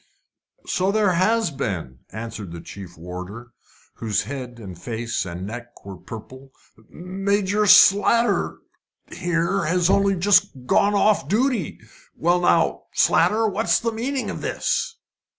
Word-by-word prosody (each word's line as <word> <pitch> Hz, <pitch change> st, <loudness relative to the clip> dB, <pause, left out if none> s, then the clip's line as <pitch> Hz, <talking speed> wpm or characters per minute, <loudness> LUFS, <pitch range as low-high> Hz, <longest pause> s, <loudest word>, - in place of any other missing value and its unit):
"So 190 Hz, +1 st, 0 dB
there 210 Hz, -2 st, +2 dB
has 210 Hz, +2 st, +2 dB
been," 90 Hz, -, -4 dB
answered 110 Hz, -4 st, -7 dB
the 85 Hz, -, -7 dB
chief 90 Hz, -1 st, -11 dB
warder, 90 Hz, +8 st, -8 dB, 0.5 s
whose 110 Hz, -3 st, -1 dB
head 130 Hz, -3 st, -7 dB
and 100 Hz, -6 st, -9 dB
face 115 Hz, -3 st, -3 dB
and 90 Hz, +2 st, -6 dB
neck 120 Hz, +2 st, -9 dB
were 100 Hz, -1 st, -7 dB
purple. 130 Hz, +7 st, -11 dB, 0.4 s
"Warder 195 Hz, +3 st, -1 dB
Slater 205 Hz, +5 st, +5 dB, 0.5 s
here 175 Hz, +1 st, -1 dB
has 180 Hz, +3 st, +2 dB
only 195 Hz, 0 st, +3 dB
just 185 Hz, -7 st, +2 dB
gone 205 Hz, +10 st, +3 dB
off 205 Hz, -7 st, +2 dB
duty. 245 Hz, -, 0 dB, 0.4 s
Now 175 Hz, +1 st, +2 dB
then, 175 Hz, -, +2 dB, 0.2 s
Slater, 220 Hz, +1 st, +3 dB
what's 210 Hz, +2 st, +1 dB
the 230 Hz, -, -1 dB
meaning 255 Hz, +4 st, -3 dB
of -, -, -7 dB
this?" 460 Hz, -, -1 dB
170 Hz, 130 wpm, -22 LUFS, -, 0.5 s, Slater